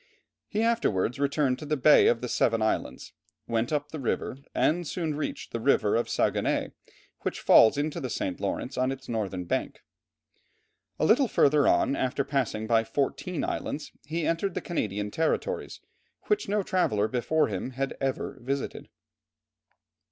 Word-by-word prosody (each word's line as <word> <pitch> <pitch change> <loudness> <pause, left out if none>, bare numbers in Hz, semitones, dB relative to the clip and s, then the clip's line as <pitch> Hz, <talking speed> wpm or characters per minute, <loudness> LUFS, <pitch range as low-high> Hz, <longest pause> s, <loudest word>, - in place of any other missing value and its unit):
He 215 +1 -1
afterwards 140 - +1
returned 140 -2 +1
to 155 - -7
the 150 0 0
Bay 150 +3 +6
of 115 - +2
the 125 - -3
Seven 115 -1 +1
Islands, 110 -11 -2 0.3
went 115 +2 -1
up 145 -1 -1
the 155 - -5
river, 130 0 -2 0.2
and 170 +1 +1
soon 160 -2 -2
reached 150 - -4
the 115 - -3
river 115 -2 +2
Saguenay, - - 0 0.5
which - - -3
falls 115 +5 +6
into 150 +1 -1
the 130 - -4
St. 95 -5 -3
Lawrence 125 +6 -3
on 130 +1 +1
its 135 0 -7
northern 100 -5 -2
bank. - - -3 1.1
A - - +1
little 250 - +4
further 145 -7 +3
on, 140 - +3
after 130 +1 0
passing 130 -6 -1
by 115 0 +3
fourteen 145 +8 -2
islands, 150 - -4 0.2
he 160 +1 -2
entered 165 +3 -1
the - - 0
Canadian 105 - -3
territories, 165 - -2 0.4
which 420 - 0
no 205 0 +1
traveller 110 - +1
before 130 +7 +1
him 100 +4 -3
had 135 +2 -3
ever 135 -1 -2
visited. 135 +3 -4
135 Hz, 155 wpm, -27 LUFS, 115-155 Hz, 1.1 s, Bay